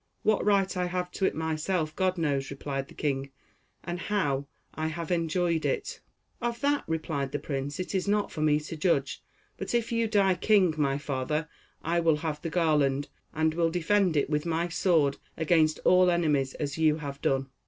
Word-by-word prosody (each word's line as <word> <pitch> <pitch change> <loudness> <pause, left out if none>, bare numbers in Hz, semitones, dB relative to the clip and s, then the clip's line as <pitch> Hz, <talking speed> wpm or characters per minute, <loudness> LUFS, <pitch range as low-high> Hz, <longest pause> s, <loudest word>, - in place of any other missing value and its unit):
"What 215 -1 +2
right 200 -2 +2
I 180 0 0
have 180 0 -3
to 190 - -1
it - - +1
myself, 160 +1 -1
God 185 -1 +1
knows," 140 -4 0
replied 140 -1 -4
the - - -15
king, 140 -2 -2 0.5
"and 175 0 -4
how 145 -10 -1 0.3
I 155 0 -2
have 165 +2 -4
enjoyed 170 -1 +1
it." - - -2 0.4
"Of 235 0 -2
that," 285 0 +1
replied 155 -4 -2
the 145 - -1
prince, 140 +1 -4
"it 185 - -4
is 190 0 0
not 205 0 +1
for 155 - -5
me 150 -1 +3
to 155 +2 -7
judge; 150 -4 0 0.4
but - - -3
if 235 -1 0
you 230 -1 +1
die 200 -3 +3
king, 185 -2 +3
my 140 -3 +1
father, 145 +2 -2 0.4
I 170 +2 +1
will 165 -2 +3
have 150 -2 -2
the 165 - -3
garland, 150 -5 +1 0.2
and 160 0 +1
will 165 0 +2
defend 180 0 +2
it 145 - +2
with 150 0 0
my 170 +1 -1
sword 160 -5 +2 0.2
against 160 -1 +3
all 180 0 +6
enemies 150 -6 +1
as 145 +1 -4
you 155 -1 +4
have 140 -3 -7
done." 135 0 0
160 Hz, 190 wpm, -28 LUFS, 145-180 Hz, 0.5 s, all